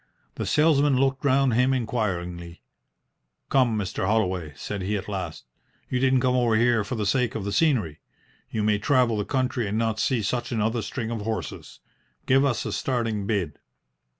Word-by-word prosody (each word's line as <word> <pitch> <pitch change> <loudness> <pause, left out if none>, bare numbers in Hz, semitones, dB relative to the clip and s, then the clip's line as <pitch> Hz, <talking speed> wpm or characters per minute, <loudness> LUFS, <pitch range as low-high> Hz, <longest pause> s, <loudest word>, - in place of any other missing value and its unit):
The - - -4
salesman 150 -3 +3
looked 135 0 +1
round 135 -2 +3
him 125 +3 +3
inquiringly. 90 -8 -3 0.9
"Come, 125 -5 +3
Mr. 95 -2 -2
Holloway," 95 -7 0
said 100 +7 -5
he, 105 +3 -1
at 100 - -7
last. 95 -10 -5 0.5
"You 125 - +1
didn't 130 -1 +3
come 130 0 +2
over 120 -3 +2
here 115 -1 +3
for 100 - -4
the 105 -2 -2
sake 125 +3 +1
of 105 -3 -3
the 100 - -2
scenery. 115 - +1 0.5
You 110 - -2
may 105 -1 +2
travel 125 0 +2
the 105 -1 -2
country 130 -3 -1
and 105 +2 -2
not 115 -1 0
see 125 -5 +1
such 120 +4 -2
another 115 0 0
string 115 -1 -4
of 115 -2 -3
horses. 110 +1 -5 0.4
Give 135 +1 +4
us 135 -5 0
a - - -3
starting 115 -6 -1
bid." 90 -9 -2
115 Hz, 180 wpm, -25 LUFS, 105-130 Hz, 0.9 s, Give